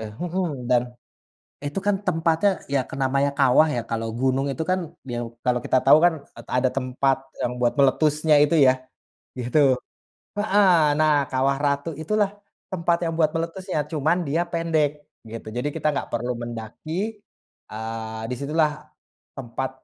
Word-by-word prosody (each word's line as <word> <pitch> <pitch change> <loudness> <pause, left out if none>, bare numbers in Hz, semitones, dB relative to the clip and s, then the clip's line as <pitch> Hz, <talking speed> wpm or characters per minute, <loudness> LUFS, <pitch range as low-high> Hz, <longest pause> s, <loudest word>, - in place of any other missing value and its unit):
Eh, 110 -1 -6
mhm, 170 -8 -3
dan 120 -1 +4 0.8
itu 145 +6 -3
kan 205 -1 +3
tempatnya 165 +4 +2 0.2
ya 135 - +4
ke - - -6
namanya 140 +2 +2
kawah 135 +3 +5
ya, 120 - -1
kalau 115 0 -2
gunung 135 +1 +1
itu 160 - -4
kan 185 0 +2 0.3
biau 120 -1 -4
kalau 125 -1 +2
kita 130 - +3
tahu 150 +3 +8
kan 175 -1 +5 0.2
et 115 - -11
ada 130 +1 +3
tempat 135 +1 +1 0.3
yang 125 - 0
buat 120 -1 +2
meletusnya 150 +3 +3
itu 150 - +1
ya, 130 - +7 0.7
gitu. 125 +5 +1 0.8
Heeh, 205 -1 +4 0.3
nah 155 -1 +4 0.2
Kawah 135 +1 +1
Ratu 140 +2 0
itulah 205 +3 +1 0.4
tempat 170 -1 +1
yang 165 - -1
buat 155 -2 +4
meletusnya, 170 +2 -3
cuman 160 +4 +1
dia 165 +5 +1
pendek 165 -3 +1 0.4
gitu. 115 -1 -8
Jadi 125 +4 -1
kita 155 - 0
nggak - - -3
perlu 120 +1 -1
mendaki, 120 +5 -7 0.8
eee, 110 0 -5
di - - -1
situlah 150 +2 +2 0.7
tempat, 130 0 -4
140 Hz, 155 wpm, -24 LUFS, 125-165 Hz, 0.8 s, tahu